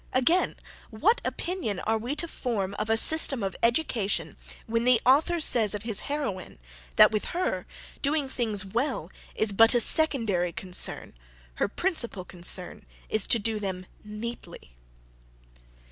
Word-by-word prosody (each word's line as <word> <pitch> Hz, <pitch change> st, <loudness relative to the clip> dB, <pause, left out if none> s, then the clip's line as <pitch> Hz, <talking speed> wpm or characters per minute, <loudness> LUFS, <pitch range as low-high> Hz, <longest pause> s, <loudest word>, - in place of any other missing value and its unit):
Again. 295 Hz, +9 st, +2 dB, 0.3 s
What 395 Hz, -, +1 dB
opinion 345 Hz, -, -3 dB
are 220 Hz, 0 st, -1 dB
we 245 Hz, +6 st, -4 dB
to 335 Hz, -, 0 dB
form 210 Hz, -, -3 dB
of 215 Hz, +1 st, -3 dB
a 225 Hz, -, +3 dB
system 275 Hz, -3 st, +4 dB
of 195 Hz, -1 st, -3 dB
education, 225 Hz, -, 0 dB, 0.3 s
when 230 Hz, +1 st, -1 dB
the 250 Hz, -1 st, +4 dB
author 310 Hz, +7 st, +3 dB
says 225 Hz, -9 st, +5 dB
of 205 Hz, -, -6 dB
his 220 Hz, -3 st, +3 dB
heroine, 270 Hz, -11 st, -4 dB, 0.4 s
"that -, -, +7 dB
with 215 Hz, -1 st, -2 dB
her, 365 Hz, -, -2 dB, 0.3 s
doing 290 Hz, 0 st, 0 dB
things 220 Hz, -6 st, -1 dB
well 230 Hz, -, -3 dB, 0.2 s
is 220 Hz, -1 st, +2 dB
but 225 Hz, +4 st, +5 dB
a -, -, +4 dB
SECONDARY 225 Hz, -, +2 dB
concern; 180 Hz, +1 st, -2 dB, 0.5 s
her -, -, +3 dB
principal 235 Hz, -, -3 dB
concern 180 Hz, 0 st, -6 dB, 0.3 s
is 215 Hz, -2 st, -1 dB
to -, -, +4 dB
do 220 Hz, 0 st, -2 dB
them 190 Hz, -2 st, -5 dB, 0.2 s
NEATLY." 210 Hz, -, -8 dB
225 Hz, 145 wpm, -26 LUFS, 200-270 Hz, 0.5 s, that